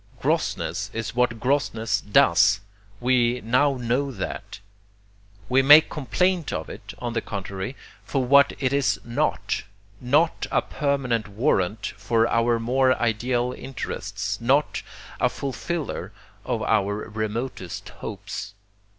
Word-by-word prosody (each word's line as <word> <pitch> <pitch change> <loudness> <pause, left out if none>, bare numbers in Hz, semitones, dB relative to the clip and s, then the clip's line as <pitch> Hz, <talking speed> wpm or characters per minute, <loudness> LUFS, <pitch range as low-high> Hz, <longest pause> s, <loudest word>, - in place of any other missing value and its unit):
Grossness 100 +4 -1
is 115 -1 -4
what 120 -2 +1
grossness 120 -4 0
DOES 100 0 +4 0.4
we 125 -1 +2
now 130 +5 +2
know 125 +3 0
THAT. 95 -2 -6 0.9
We 130 +4 +4
make 150 +4 +8
complaint 175 +4 0
of - - -4
it, - - -10
on 120 -1 -4
the 115 - 0
contrary, 100 +4 -5 0.3
for 135 -3 -1
what 140 +2 +6
it 130 -1 0
is 140 -1 +2
NOT 120 0 -1 0.4
not 150 +7 +2
a - - +1
permanent 130 -6 -1
warrant 105 -2 0
for 115 +2 +2
our 115 0 +2
more 130 +2 +2
ideal 120 +2 0
interests, 105 -5 -5
not 135 +5 +2 0.4
a - - +3
fulfiller 150 +3 -4 0.3
of - - -1
our 100 -2 +1
remotest 110 -2 -4
hopes. 100 0 -6
120 Hz, 120 wpm, -24 LUFS, 105-135 Hz, 0.9 s, make